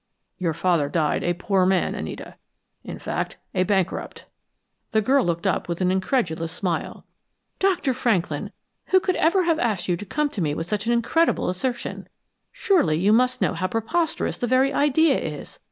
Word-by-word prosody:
Your 170 -4 -1
father 170 -5 +1
died 155 -2 0
a 175 0 0
poor 190 +1 +1
man, 185 0 +2
Anita. - - -6 0.5
In - - -7
fact, - - -4 0.2
a 185 - +1
bankrupt." 190 -2 -2 0.7
The 220 - +4
girl 265 +4 +3
looked 170 -2 -2
up - - 0
with 170 - -2
an 185 -1 +2
incredulous 185 -5 -1
smile. 175 -3 -3 0.5
"Dr. 365 -8 +1
Franklin, 225 -8 -1 0.3
who 375 - +4
could 370 -1 -1
ever 365 +4 +3
have 330 -2 +1
asked 210 - -1
you 180 - +2
to 205 - -7
come 300 +9 -1
to 200 - -4
me 150 -3 0
with 165 - -3
such 210 +3 -2
an - - +2
incredible 240 +8 +2
assertion? 240 +7 -4 0.4
Surely, 320 - +2
you 200 +5 +3
must 255 +2 +2
know - - +1
how 185 +2 -1
preposterous 230 - -1
the 245 - -1
very 260 +3 +3
idea 290 +1 +3
is! 150 -3 -7
210 Hz, 175 wpm, -23 LUFS, 175-270 Hz, 0.7 s, The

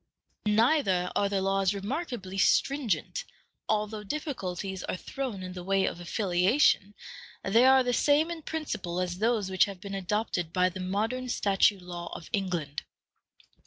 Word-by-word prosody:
Neither 210 - +3
are 200 - +2
the 195 -1 0
laws 195 0 +1
remarkably 200 - -4
stringent: 275 - +1 0.5
although 215 0 -1
difficulties 195 - -4
are - - -3
thrown 240 -4 -5
in 185 0 -6
the 180 -1 -7
way 195 +1 +2
of - - -3
affiliation, 195 - +2 0.5
they 225 +6 +4
are 265 0 +6
the 245 0 0
same 295 +6 +3
in 335 -1 -5
principle 250 - -3
as 180 0 -2
those 215 -3 +1
which 185 - +5
have 195 -2 -8
been 200 0 -7
adopted 195 -3 -1
by 180 +1 +3
the 185 +1 -8
modern 220 +7 -2
statute 200 -3 +2
law 175 -1 -7
of - - -10
England. 175 -8 -2
195 Hz, 150 wpm, -29 LUFS, 185-240 Hz, 0.5 s, are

